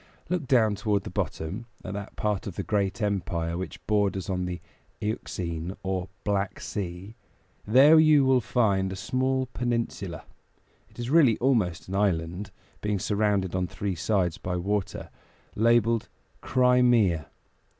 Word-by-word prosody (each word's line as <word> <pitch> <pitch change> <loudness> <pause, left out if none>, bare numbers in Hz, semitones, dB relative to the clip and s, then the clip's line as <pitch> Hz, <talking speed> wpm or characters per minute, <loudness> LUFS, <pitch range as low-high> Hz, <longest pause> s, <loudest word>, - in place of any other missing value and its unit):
Look 175 -6 -1
down 115 -5 +4
toward 105 -1 0
the - - -7
bottom, 95 +9 -3 0.2
at 95 - -4
that 100 0 -7
part 105 -2 -1
of 95 - -6
the - - -3
great 100 +1 -1
empire 85 -5 -1
which 95 +2 -6
borders 100 -3 0
on 90 -1 -1
the 90 -1 -4 0.4
Euxine 90 -4 -4
or 95 -2 -2
Black 100 -1 -1
Sea; 95 +1 -5 0.5
there 140 +8 +7
you 155 -3 +6
will 130 -1 +4
find 100 -5 +1
a - - -4
small 130 +6 0
peninsula 115 -8 -2 0.7
it - - -23
is 120 +1 -4
really 145 -9 +5
almost 110 -10 +1
an 95 - -6
island, 95 -1 0 0.3
being 105 -1 0
surrounded 100 -2 0
on 90 -1 0
three 100 +2 -3
sides 90 -1 0
by 90 -1 -3
water 100 +2 -2 0.4
labeled 115 0 +3 0.3
"Crimea." 125 - +3
100 Hz, 140 wpm, -27 LUFS, 95-115 Hz, 0.7 s, there